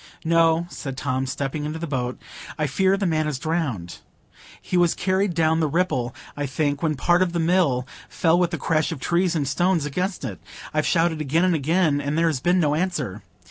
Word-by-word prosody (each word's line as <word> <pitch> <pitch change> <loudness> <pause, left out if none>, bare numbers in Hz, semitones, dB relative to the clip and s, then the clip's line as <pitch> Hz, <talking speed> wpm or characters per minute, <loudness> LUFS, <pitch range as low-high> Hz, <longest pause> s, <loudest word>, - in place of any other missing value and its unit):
"No," 165 0 +3
said 135 -3 -6
Tom, 130 -1 -1
stepping 140 +3 -3
into 150 +2 -3
the 165 - -4
boat; 125 -5 -3 0.4
"I 155 - 0
fear 190 +7 +2
the 200 - -1
man 155 -3 +1
is 150 -3 -2
drowned; 130 - -3 0.6
he - - -4
was 175 -2 +3
carried 190 0 0
down 160 -1 +2
the 160 - +2
Ripple, 135 -7 0 0.2
I 145 -1 -2
think, 145 +1 -1
when 155 -2 0
part 175 +6 +2
of 180 -2 +1
the 170 - 0
Mill 165 -7 +2 0.2
fell 165 +1 +2
with 175 -2 +2
the - - -3
crash 160 +1 0
of 160 - -5
trees 175 +4 +1
and 145 -3 0
stones 170 +2 +1
against 180 +3 -2
it; 100 -8 -6 0.3
I've 155 0 +1
shouted 165 -2 +1
again 155 +5 +2
and 185 - +3
again, 155 0 +1
and 145 +2 -2
there 165 - +3
has 155 -5 +1
been 175 +6 +2
no 150 -4 +2
answer. 155 - -2
160 Hz, 210 wpm, -23 LUFS, 140-175 Hz, 0.6 s, No